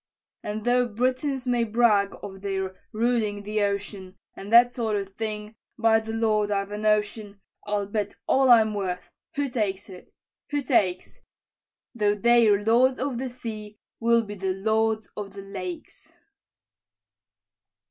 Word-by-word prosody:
"And 210 Hz, +1 st, -5 dB
though 245 Hz, 0 st, +3 dB
Britons 255 Hz, +4 st, -1 dB
may 245 Hz, -1 st, +1 dB
brag 215 Hz, -3 st, +2 dB
of 195 Hz, -2 st, -8 dB
their 190 Hz, -1 st, -3 dB, 0.2 s
ruling 220 Hz, -3 st, 0 dB
the 210 Hz, +1 st, -1 dB
ocean, 200 Hz, -2 st, -3 dB, 0.2 s
And 200 Hz, +2 st, -9 dB
that 240 Hz, +1 st, +7 dB
sort 225 Hz, -3 st, -1 dB
of 200 Hz, -1 st, -3 dB
thing, 215 Hz, -1 st, -4 dB, 0.2 s
by 225 Hz, -1 st, +4 dB
the 220 Hz, 0 st, -6 dB
Lord, 215 Hz, -2 st, +1 dB
I've 200 Hz, 0 st, -1 dB
a 210 Hz, -, -4 dB
notion, 210 Hz, -1 st, 0 dB, 0.3 s
I'll 205 Hz, -1 st, 0 dB
bet 205 Hz, 0 st, -3 dB
all 265 Hz, -1 st, +3 dB
I'm 220 Hz, -3 st, +6 dB
worth 185 Hz, -3 st, -4 dB, 0.2 s
who 285 Hz, -1 st, 0 dB
takes 205 Hz, -6 st, -2 dB
it 185 Hz, -1 st, -13 dB, 0.4 s
who 290 Hz, -1 st, -1 dB
takes? 195 Hz, -9 st, 0 dB, 0.7 s
Though 210 Hz, -3 st, +1 dB
they're 220 Hz, -2 st, +4 dB
lords 255 Hz, +4 st, +4 dB
of 260 Hz, -3 st, -2 dB
the 260 Hz, 0 st, -3 dB
sea, 215 Hz, -4 st, -7 dB, 0.2 s
we'll 235 Hz, 0 st, +3 dB
be 205 Hz, -1 st, -7 dB
lords 220 Hz, +3 st, 0 dB
of 200 Hz, -2 st, -6 dB
the 195 Hz, 0 st, -9 dB
lakes." 320 Hz, -, -8 dB
215 Hz, 145 wpm, -25 LUFS, 205-235 Hz, 0.7 s, that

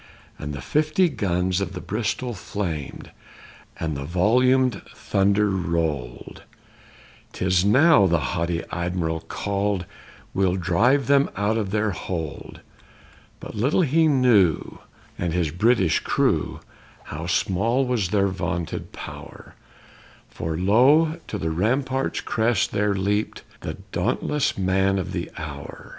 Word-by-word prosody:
_ -, -, -9 dB
And 75 Hz, -, -4 dB
the 70 Hz, -, -6 dB
fifty 155 Hz, +4 st, +2 dB
guns 95 Hz, -, 0 dB
of 95 Hz, -1 st, -3 dB
the 90 Hz, -, -5 dB
Bristol 110 Hz, +5 st, -2 dB
flamed, 90 Hz, -7 st, -5 dB, 0.7 s
and 80 Hz, -3 st, -2 dB
the 70 Hz, -, -4 dB
volumed 125 Hz, -, +2 dB
thunder 100 Hz, +1 st, +1 dB
rolled; 85 Hz, -9 st, -3 dB, 0.9 s
'Tis 90 Hz, -1 st, +1 dB
now, 130 Hz, -, +5 dB
the 85 Hz, -1 st, +2 dB, 0.2 s
haughty 85 Hz, 0 st, -1 dB
Admiral 85 Hz, -1 st, -2 dB
cried, 100 Hz, -2 st, -1 dB, 0.5 s
we'll 95 Hz, -2 st, +1 dB
drive 110 Hz, +10 st, +2 dB
them 140 Hz, +2 st, +3 dB
out 100 Hz, +2 st, 0 dB
of 105 Hz, -4 st, -1 dB
their 105 Hz, +1 st, 0 dB
hold! 80 Hz, -5 st, -6 dB, 0.8 s
But -, -, -9 dB
little 125 Hz, -, +1 dB
he 160 Hz, +2 st, +3 dB
knew, 120 Hz, -, +3 dB, 0.4 s
and 85 Hz, -2 st, -1 dB
his 85 Hz, -4 st, 0 dB
British 95 Hz, -2 st, +2 dB
crew, -, -, 0 dB, 0.4 s
how 80 Hz, +3 st, -6 dB
small 110 Hz, +8 st, +1 dB
was 120 Hz, -8 st, 0 dB
their 100 Hz, 0 st, +2 dB
vaunted 90 Hz, -3 st, -4 dB
power, -, -, -10 dB, 0.8 s
For 80 Hz, 0 st, -4 dB
lo, 140 Hz, -, +4 dB
to 105 Hz, -, -4 dB
the 80 Hz, -4 st, -2 dB
rampart's 130 Hz, -, 0 dB
crest 110 Hz, -2 st, 0 dB
there 105 Hz, -1 st, +1 dB
leaped 100 Hz, +2 st, -1 dB, 0.2 s
the 80 Hz, -, -5 dB, 0.2 s
dauntless 125 Hz, +9 st, 0 dB
man 95 Hz, +1 st, +2 dB
of 95 Hz, -1 st, -3 dB
the 85 Hz, -2 st, -4 dB
hour! 75 Hz, -3 st, -8 dB
100 Hz, 125 wpm, -23 LUFS, 85-120 Hz, 0.9 s, now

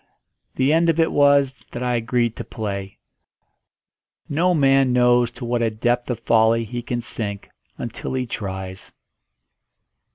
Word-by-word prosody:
The 135 Hz, +3 st, +2 dB
end 165 Hz, +1 st, +3 dB
of 165 Hz, 0 st, +1 dB
it 165 Hz, -, +3 dB
was 140 Hz, -2 st, +3 dB
that 120 Hz, -, -5 dB
I 125 Hz, 0 st, 0 dB
agreed 120 Hz, 0 st, 0 dB
to -, -, -4 dB
play. 100 Hz, -3 st, -5 dB, 1.3 s
No 175 Hz, +5 st, +1 dB
man 135 Hz, -3 st, +4 dB
knows 125 Hz, -1 st, +4 dB
to 125 Hz, 0 st, -7 dB
what 120 Hz, 0 st, -1 dB
a 115 Hz, -, +2 dB
depth 120 Hz, +3 st, -1 dB
of 120 Hz, -2 st, -3 dB
folly 115 Hz, 0 st, +3 dB
he 120 Hz, +2 st, -5 dB
can 120 Hz, 0 st, -3 dB
sink 105 Hz, -3 st, -4 dB, 0.3 s
until 120 Hz, +2 st, -5 dB
he 130 Hz, -1 st, -1 dB
tries. 95 Hz, -4 st, -6 dB
120 Hz, 150 wpm, -22 LUFS, 110-135 Hz, 1.3 s, man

